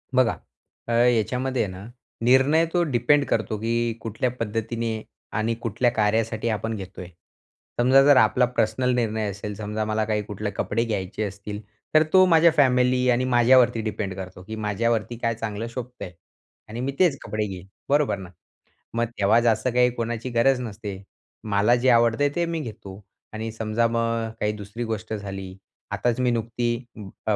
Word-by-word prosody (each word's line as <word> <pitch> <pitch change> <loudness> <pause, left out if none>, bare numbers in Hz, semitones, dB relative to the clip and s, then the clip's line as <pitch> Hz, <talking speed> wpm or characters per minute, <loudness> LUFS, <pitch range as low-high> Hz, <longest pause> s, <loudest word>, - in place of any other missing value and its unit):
बघा, 130 -2 +4 0.5
अ, - - -3
याच्यामध्ये 125 +2 +2
आहे 100 - -4
ना, 95 +2 -9 0.4
निर्णय 135 +7 +4
तो 175 -1 +3
डिपेंड 145 0 +2
करतो 110 -1 -1
की 115 +1 0
कुठल्या 115 +3 -2
पद्धतीने 115 0 -2 0.4
आणि 115 +2 0
कुठल्या 120 +2 +1
कार्यासाठी 110 +1 0
आपण 110 +1 -2
घेतोय. 95 -2 -8 0.7
समजा 130 +3 +6
जर 145 -1 +6
आपला 110 +4 +4
पर्सनल 125 +4 +1
निर्णय 110 -3 -1
असेल, 100 +1 -6
समजा 105 +1 -3
मला 110 0 0
काही 105 -1 0
कुठले 105 0 -5
कपडे 105 +3 -1
घ्यायचे 105 -1 -3
असतील, 105 +1 -6 0.4
तर 155 - +7
तो 185 0 +7
माझ्या 170 -1 +5
फॅमिली 125 -2 +3
आणि 125 +1 +2
माझ्यावरती 120 -1 +4
डिपेंड 105 -3 -3
करतो 95 -1 -8
की 110 +3 -7
"माझ्यावरती 110 +2 -1
काय 115 0 -1
चांगलं 110 0 -4
शोभतंय?" 125 -6 -7 0.6
आणि 115 +2 -6
"मी 135 - -1
तेच 170 -7 +4
कपडे 105 -1 -2
घेईन, 95 -1 -8 0.2
बरोबर 145 -6 +2
ना?" 95 -2 -9 0.7
मग 120 0 +1
तेव्हा 100 +3 +4
जास्त 115 0 +2
काही 125 0 +4
कोणाची 120 +1 -4
गरज 125 +2 +3
नसते, 105 -4 -6 0.4
मला 105 +2 +3
जे 125 +2 +2
आवडतय 120 +4 +4
ते 175 - +1
मी 165 -1 -3
घेतो. 105 -6 -8 0.3
आणि 110 +1 -4
समजा 110 +1 0
मग 115 -1 -1
काही 105 - +1
दुसरी 105 +3 -6
गोष्ट 110 -1 -4
झाली 95 -2 -6 0.4
आताच 120 0 0
मी 125 -1 +2
नुकती 115 +1 -2 0.3
अं, 100 -3 -8 0.2
अ, 110 - +3
115 Hz, 165 wpm, -24 LUFS, 105-125 Hz, 0.7 s, तर